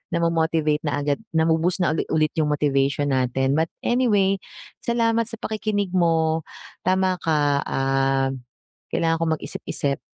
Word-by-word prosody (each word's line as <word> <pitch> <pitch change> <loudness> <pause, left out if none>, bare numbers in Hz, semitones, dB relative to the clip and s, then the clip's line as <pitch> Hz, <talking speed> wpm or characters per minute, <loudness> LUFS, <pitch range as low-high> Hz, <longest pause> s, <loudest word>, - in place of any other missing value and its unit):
namo-motivate 160 -2 +1
na 145 0 -1
agad, 145 -1 0 0.2
nabu-boost 165 +3 +2
na 155 - +2
uli 160 - -2
ulit 155 -1 +1
'yong 150 - +2
motivation 140 0 +1
natin. 130 +1 +1
But 160 - +1 0.2
anyway, 205 -6 +2 0.4
salamat 230 -1 +1
sa 230 - -5
pakikinig 210 -3 -2
mo, 165 -3 +1 0.4
tama 185 0 +2
ka, 145 -3 +1
ah, 135 0 +1 0.6
kailangan 165 0 0
ko - - +2
mag-isip-isip.a 140 -2 -3
160 Hz, 130 wpm, -23 LUFS, 145-185 Hz, 0.6 s, nabu-boost